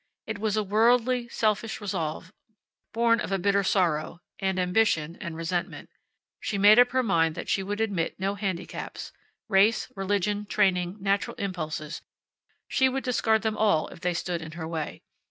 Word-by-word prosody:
It 220 -2 -5
was 215 0 0
a 215 - +2
worldly, 235 +4 +2
selfish 220 -1 -1
resolve, 185 -4 -4 0.6
born 230 0 +3
of - - -4
a 195 - +2
bitter 200 +2 +2
sorrow, 175 -4 0 0.2
and 190 -1 -1
ambition, 180 -4 +1
and 170 -4 -5
resentment. 170 +1 -3 0.5
She 205 - -3
made 205 +3 +7
up 245 0 +6
her 260 +1 +1
mind 165 -7 +2
that - - -6
she 195 - +1
would 205 +2 -4
admit 195 -8 -1
no 195 +1 0
handicaps. 195 -3 -5 0.4
Race, 210 +3 +3
religion, 205 +1 -1
training, 185 -2 +1
natural 200 +1 0
impulses 160 -5 -4 0.7
she 265 0 +3
would 270 +1 -3
discard 225 -3 +1
them 220 -1 0
all 205 -8 +2
if - - -12
they 180 -1 0
stood 170 -1 -2
in 155 -1 -8
her 160 -1 -5
way. 160 -2 -5
195 Hz, 165 wpm, -27 LUFS, 175-220 Hz, 0.7 s, made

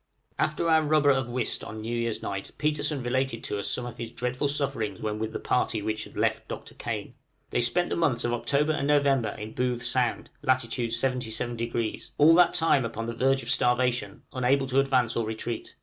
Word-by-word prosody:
After 155 +2 0
our 160 -1 +5
rubber 150 -1 +4
of 135 -3 0
whist 120 -1 -1
on 110 0 -7
New 115 +2 -3
Year's 115 -2 -2
night 100 0 -4
Petersen 150 -2 0
related 130 -1 -1
to 105 - -2
us 100 - -1
some 125 - -1
of 120 - -8
his 115 -1 -5
dreadful 125 +4 -1
sufferings 115 -9 -1
when 105 -1 -3
with 110 0 -2
the - - -3
party 115 -4 0
which 110 0 -2
had - - -13
left - - 0
Dr. - - -7
Kane. - - -5 0.4
They 120 - +1
spent 175 +10 +1
the - - +1
months 130 -8 +1
of 120 - 0
October 145 +5 +1
and 140 -2 -1
November 140 -5 +3
in 105 +1 -7
Booth 125 -1 -1
Sound, 125 -1 0
lat. 130 -2 +3
77°; 115 -1 -2
all 155 +3 +7
that 175 +1 +5
time 160 -5 +3
upon 115 -1 -4
the 115 - -3
verge 135 +2 +2
of 115 - -6
starvation, 125 -1 +1
unable 135 +2 +2
to 130 +1 +2
advance 130 -4 +2
or 115 - +1
retreat. 110 +1 -4
125 Hz, 200 wpm, -27 LUFS, 115-140 Hz, 0.4 s, all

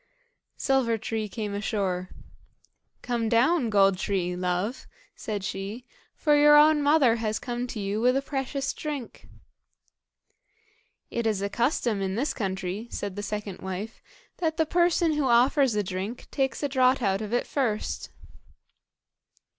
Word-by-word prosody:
Silver 255 -4 +1
tree 220 0 -3
came 210 -1 -4
ashore. 195 -3 -2 0.9
"Come 235 -2 -1
down, 250 +3 +3
Gold 195 -3 +4
tree, 180 -3 -1
love," 180 +6 -2 0.3
said 205 -3 -4
she, 200 +6 -5 0.3
"for 300 -2 +3
your 295 0 +7
own 300 0 +6
mother 285 -5 +4
has 215 -2 -1
come 245 -1 -4
to 230 - -6
you 200 +2 -2
with 250 +2 +3
a - - +1
precious 275 0 -3
drink." 290 -6 -6 1.8
"It 235 -1 -1
is 205 -3 0
a 200 - -1
custom 235 -2 0
in 190 0 -2
this 275 +7 -1
country," 190 0 -3
said 200 -4 -5
the 205 - -4
second 205 -2 -5
wife, 190 +4 -6 0.4
"that 320 -3 -1
the 320 - +3
person 345 0 +2
who 295 -2 0
offers 255 +1 +4
a 210 - +1
drink 190 +5 -5
takes 270 +1 -1
a - - +2
draught 260 -1 +2
out 195 0 +1
of 215 -1 -5
it 245 - +1
first." 235 -7 -2
230 Hz, 145 wpm, -26 LUFS, 200-270 Hz, 1.8 s, your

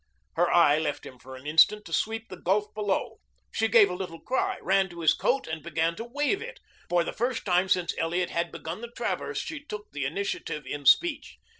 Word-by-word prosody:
Her 175 +1 +2
eye 155 -3 +5
left 150 -2 -3
him 130 - -11
for 130 +1 -11
an 130 +2 -13
instant 160 +8 +4
to 165 - -9
sweep 225 +5 -1
the 185 - -7
gulf 205 +3 0
below. 205 -2 -2 0.3
She 225 - +1
gave 220 -1 +6
a 180 - -4
little 180 -3 -6
cry, 260 - -1
ran 190 +1 +2
to 170 -1 -9
his 160 - +5
coat, 270 +2 0
and 160 0 -5
began 165 +1 -1
to - - -4
wave 290 - -1
it. - - -8 0.3
For 175 -1 +3
the - - -5
first 245 +1 -2
time 185 0 +2
since 180 -1 +2
Elliot 175 +2 0
had 170 0 -1
begun 165 +6 -6
the 235 - -5
traverse 235 - -3
she 310 -2 -6
took 210 -7 -8
the 140 -2 -3
initiative 155 -2 -3
in 145 -2 -4
speech. 305 - +3
180 Hz, 215 wpm, -27 LUFS, 165-225 Hz, 0.3 s, gave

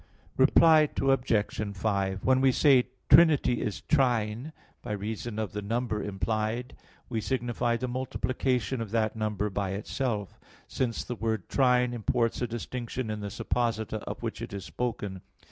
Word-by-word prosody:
_ - - -26 0.3
Reply 155 -2 +6
Obj. 110 -6 +1
5: 95 -2 -1
When 130 0 +4
we 135 -1 +5
say, 130 -2 +4 0.2
"Trinity 145 -7 +5
is 105 - -3
trine," 125 -1 +1 0.3
by 105 - -4
reason 105 +2 -4
of 110 -4 -2
the 105 - -4
number 115 +1 -2
implied, 110 +5 -2 0.3
we 115 -3 -2
signify 120 -1 -1
the 130 - -3
multiplication 130 -2 -1
of 110 - -4
that 110 0 0
number 105 -1 -1
by 95 -1 -2
itself; 105 0 -3 0.3
since 120 -3 -2
the - - -4
word 110 -5 -2
trine 125 -2 +3
imports 115 +1 0
a 120 - 0
distinction 120 0 -4
in 105 - -4
the 100 -1 -4
supposita 110 0 -1
of - - -6
which - - -4
it - - -6
is 100 -2 -5
spoken. 100 +1 -4
115 Hz, 155 wpm, -28 LUFS, 105-125 Hz, 0.3 s, Reply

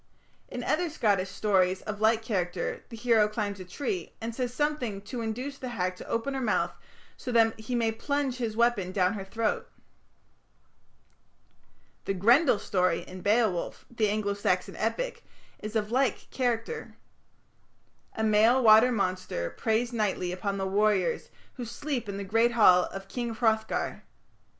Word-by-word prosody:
In - - -6
other 350 -1 +1
Scottish 200 -10 +1
stories 190 -2 +1
of 210 0 -5
like 220 +1 +3
character 180 -5 -2
the 230 - -8
hero 225 -2 +4
climbs 210 -2 -3
a - - -6
tree, 295 - -4
and 230 +1 -4
says 245 0 -2
something 250 -8 -2
to 245 +2 -5
induce 250 +5 -4
the 255 - -5
hag 185 -6 -2
to - - -10
open 230 +4 -1
her 265 - -2
mouth, 230 - +1 0.4
so 250 - -6
that 225 -2 +3
he 220 +3 -3
may 230 -2 +2
plunge 270 +3 -2
his 230 -3 -3
weapon 235 -6 +2
down 185 0 +2
her 200 -3 -5
throat. 220 +3 -2 2.4
The 195 - -1
Grendel 240 - +5
story 180 -3 +1
in 185 0 -10
Beowulf, 210 -4 +1
the 220 -3 +1
Anglo 205 -1 0
Saxon 200 - -1
epic, - - -2 0.4
is 215 +1 -7
of 215 0 0
like 255 -2 0
character. 250 - -2 1.2
A 220 - -2
male 220 +4 +4
water 220 +3 +7
monster 185 - -2
preys 230 +2 0
nightly 195 -5 0
upon 195 +2 -3
the 195 - -2
warriors 200 -1 +1 0.3
who 250 - -4
sleep 245 -1 -4
in 200 - -4
the 200 - -4
great 225 +4 +2
hall 185 -6 +6
of 195 0 -8
King 235 +1 -4
Hrothgar. 220 -1 0
220 Hz, 155 wpm, -28 LUFS, 200-240 Hz, 2.4 s, water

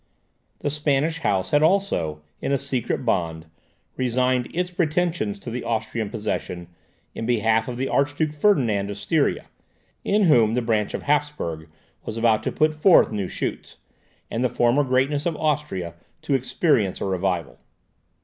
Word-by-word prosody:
The 145 - -1
Spanish 150 +2 0
House 95 - 0
had 145 - +4
also, 155 - +1 0.2
in - - -2
a 140 - +3
secret 130 -2 -2
bond, 80 -7 -1 0.5
resigned 125 0 +1
its 180 +1 -2
pretensions 170 - 0
to 115 +4 -8
the 125 +1 -4
Austrian 110 -1 -2
possessions 95 -6 -4 0.4
in 115 - -5
behalf 115 -1 +2
of 125 -1 -5
the 135 +1 -1
Archduke 145 +3 0
Ferdinand 125 - +2
of 100 - -5
Styria, 145 +8 0 0.6
in 210 +1 +2
whom 120 - +4
the 125 - +1
branch 110 -3 0
of - - -5
Hapsburg 145 - -1 0.4
was 110 - -6
about 115 -2 +3
to - - -2
put 155 0 +2
forth 155 0 +5
new 100 -3 -2
shoots, - - -5 0.5
and 115 - -1
the 125 - +2
former 120 +5 +2
greatness 135 +4 +1
of 165 -3 -2
Austria 145 - -1 0.3
to 150 - -1
experience 130 - +1
a - - -2
revival. 90 -8 -2
125 Hz, 155 wpm, -23 LUFS, 105-150 Hz, 0.6 s, forth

